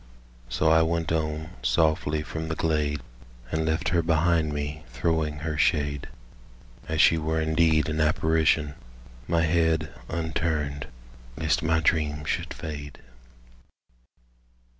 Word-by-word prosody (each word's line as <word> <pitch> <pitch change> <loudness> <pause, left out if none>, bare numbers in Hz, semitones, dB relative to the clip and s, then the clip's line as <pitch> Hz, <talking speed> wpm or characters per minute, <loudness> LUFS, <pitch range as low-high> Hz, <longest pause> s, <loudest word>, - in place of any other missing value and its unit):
So 75 +6 +2
I 80 0 +6
went 80 0 0
on 80 0 -2
softly 80 -1 +1
from 80 +1 -5
the 80 - -2
glade, 75 -3 0 0.5
And 80 0 0
left 80 +4 0
her 85 0 +2
behind 80 -1 +2
me 75 +1 -4
throwing 75 +3 -1
her 75 -2 -2
shade, 70 -2 +1 0.8
As 80 0 -2
she 80 - +6
were 80 +1 -1
indeed 80 0 +2
an 80 -1 -1
apparition— 80 -1 +2 0.5
My 85 -1 +2
head 80 -2 +1 0.2
unturned 80 -3 -2 0.5
lest - - +1
my 80 0 +2
dream 75 -2 +1
should - - -2
fade. 75 -4 -7
80 Hz, 120 wpm, -26 LUFS, 75-80 Hz, 0.8 s, I